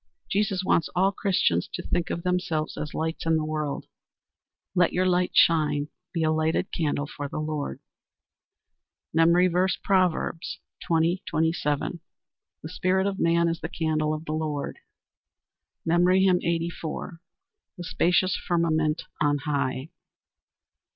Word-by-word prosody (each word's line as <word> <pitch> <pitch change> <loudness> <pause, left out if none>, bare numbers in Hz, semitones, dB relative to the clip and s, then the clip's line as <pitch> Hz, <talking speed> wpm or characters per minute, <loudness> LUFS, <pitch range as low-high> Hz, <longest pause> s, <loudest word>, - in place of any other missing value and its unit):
Jesus 195 -2 +1
wants 170 - +2
all 190 +2 +3
Christians 180 - +1
to - - -5
think 175 0 -1
of 170 - -3
themselves 180 -4 -1
as 150 0 -5
lights 160 +1 -2
in 160 0 +4
the 155 - -1
world. 155 -2 -3 0.9
"Let 180 -2 +3
your 185 +1 +2
light 180 0 +1
shine." 150 -3 +3 0.2
Be 165 -2 -1
a 155 - +3
lighted 155 0 0
candle 145 -3 -1
for 145 -1 -6
the - - -6
Lord. 150 - -3 1.3
MEMORY 170 +3 +5
VERSE, 180 +2 +2
Proverbs 180 -3 +1 0.3
20: 170 +3 +2
27 160 0 0 0.6
"The 155 - -6
spirit 185 +2 +1
of 200 0 -2
man 170 0 +3
is 165 0 -2
the 160 - -4
candle 155 -3 0
of 155 +1 -8
the 155 - -4
Lord." 155 -2 -3 1.1
MEMORY 180 +3 +4
HYMN 180 -2 +4
_"The 170 - -5
spacious 180 +1 +2
firmament 160 -2 0 0.2
on 145 -1 +3
high." 140 -1 -1
165 Hz, 130 wpm, -26 LUFS, 155-180 Hz, 1.3 s, MEMORY